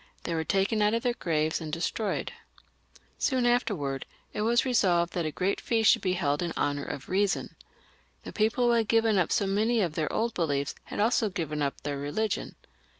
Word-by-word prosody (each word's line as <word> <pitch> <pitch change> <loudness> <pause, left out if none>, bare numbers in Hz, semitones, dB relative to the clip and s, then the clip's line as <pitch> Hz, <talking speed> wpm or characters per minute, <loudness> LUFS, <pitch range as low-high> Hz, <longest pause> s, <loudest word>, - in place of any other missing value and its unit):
They 170 - -3
were 160 -1 0
taken 195 +4 +1
out 210 +2 +3
of 230 - -2
their 245 - +1
graves 155 -6 -1
and 155 -1 -5
destroyed. 180 +6 -2 0.9
Soon 255 -3 +1
after, 240 -3 +2 0.6
it - - -2
was 235 +3 +3
resolved 180 -9 +2
that 170 -3 -1
a - - -3
great 185 +5 -1
feast 225 -2 +4
should - - +2
be 185 - 0
held 145 -5 0
in 170 -1 -2
honour 145 0 -1
of 135 - -6
Reason. 195 +1 0 0.7
The - - -8
people 225 +3 +1
who 240 - +4
had 230 -2 +2
given 225 -3 +3
up 175 - +1
so 200 - +2
many 215 +4 +1
of 175 -7 0
their 155 -1 -1
old 230 +1 0
beliefs 145 -5 -1
had - - -6
also 220 0 +2
given 160 -6 -3
up 140 -1 -2
their 145 -1 -3
religion. 200 +10 -2
195 Hz, 200 wpm, -28 LUFS, 160-225 Hz, 0.9 s, feast